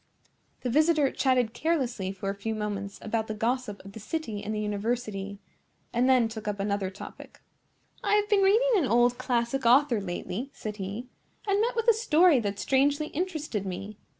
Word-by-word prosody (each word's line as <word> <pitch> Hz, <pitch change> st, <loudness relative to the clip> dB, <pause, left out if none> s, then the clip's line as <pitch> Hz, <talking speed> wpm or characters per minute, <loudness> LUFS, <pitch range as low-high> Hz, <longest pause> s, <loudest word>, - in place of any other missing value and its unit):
The 250 Hz, -, -2 dB
visitor 305 Hz, 0 st, +3 dB
chatted 250 Hz, -4 st, +1 dB
carelessly 245 Hz, -, -1 dB
for 195 Hz, 0 st, -3 dB
a -, -, -4 dB
few 220 Hz, +3 st, -4 dB
moments 200 Hz, -2 st, -4 dB
about 220 Hz, 0 st, -1 dB
the 215 Hz, -, -4 dB
gossip 230 Hz, -2 st, -2 dB
of 195 Hz, -, -9 dB
the 220 Hz, -, -9 dB
city 220 Hz, -4 st, -4 dB
and 210 Hz, -, -4 dB
the 215 Hz, -, -2 dB
university, 210 Hz, -1 st, -2 dB, 0.6 s
and 245 Hz, +2 st, +2 dB
then 250 Hz, -3 st, +5 dB
took 220 Hz, -1 st, -8 dB
up 205 Hz, -1 st, -2 dB
another 200 Hz, -1 st, -1 dB
topic. 190 Hz, -, -11 dB, 0.6 s
"I 410 Hz, 0 st, +3 dB
have 415 Hz, 0 st, +2 dB
been 410 Hz, -2 st, +3 dB
reading 445 Hz, +6 st, +4 dB
an 315 Hz, -8 st, +2 dB
old 240 Hz, +1 st, +3 dB
classic 250 Hz, +1 st, 0 dB
author 245 Hz, -1 st, +4 dB
lately," 195 Hz, +6 st, -4 dB
said 210 Hz, -1 st, -6 dB
he, 205 Hz, +5 st, -5 dB, 0.4 s
"and 400 Hz, +1 st, +2 dB
met 470 Hz, +2 st, 0 dB
with 460 Hz, 0 st, -1 dB
a 465 Hz, -, +8 dB
story 355 Hz, -, +4 dB
that 205 Hz, -3 st, -2 dB
strangely 280 Hz, -, +2 dB
interested 310 Hz, -, -3 dB
me. 195 Hz, +2 st, -6 dB
235 Hz, 180 wpm, -28 LUFS, 205-290 Hz, 0.6 s, a